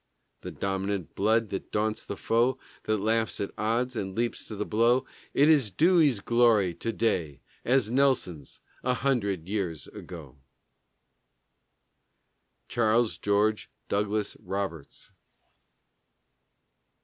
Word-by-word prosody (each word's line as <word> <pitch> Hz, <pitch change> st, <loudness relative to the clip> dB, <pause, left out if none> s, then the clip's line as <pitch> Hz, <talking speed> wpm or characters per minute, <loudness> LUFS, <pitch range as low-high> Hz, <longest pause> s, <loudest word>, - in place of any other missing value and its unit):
The -, -, -6 dB
dominant 95 Hz, -2 st, -3 dB
blood 110 Hz, +2 st, +2 dB
that 95 Hz, -, -5 dB
daunts 110 Hz, 0 st, -1 dB
the 100 Hz, -, -6 dB
foe, 120 Hz, +3 st, +1 dB, 0.3 s
That 110 Hz, 0 st, +1 dB
laughs 110 Hz, +2 st, 0 dB
at 100 Hz, -, -3 dB
odds, 120 Hz, +4 st, -1 dB
and 95 Hz, -3 st, -4 dB
leaps 120 Hz, 0 st, -2 dB
to 110 Hz, -, -6 dB
the 105 Hz, +1 st, -3 dB
blow, 120 Hz, +4 st, +2 dB, 0.3 s
It 145 Hz, -, +5 dB
is 145 Hz, -8 st, +4 dB
Dewey's 150 Hz, -, +3 dB
glory 115 Hz, -6 st, +3 dB
to 115 Hz, -, -3 dB
day, 85 Hz, -, -1 dB, 0.2 s
as 125 Hz, -3 st, +2 dB
Nelson's 125 Hz, -, 0 dB, 0.2 s
A 125 Hz, 0 st, +1 dB
hundred 100 Hz, -11 st, -1 dB
years 95 Hz, -7 st, -3 dB
ago! 75 Hz, -7 st, -11 dB, 2.3 s
CHARLES 115 Hz, 0 st, +1 dB
GEORGE 105 Hz, +1 st, +1 dB, 0.2 s
DOUGLAS 105 Hz, +1 st, -1 dB
ROBERTS. 95 Hz, -7 st, -5 dB
110 Hz, 115 wpm, -28 LUFS, 100-120 Hz, 2.3 s, It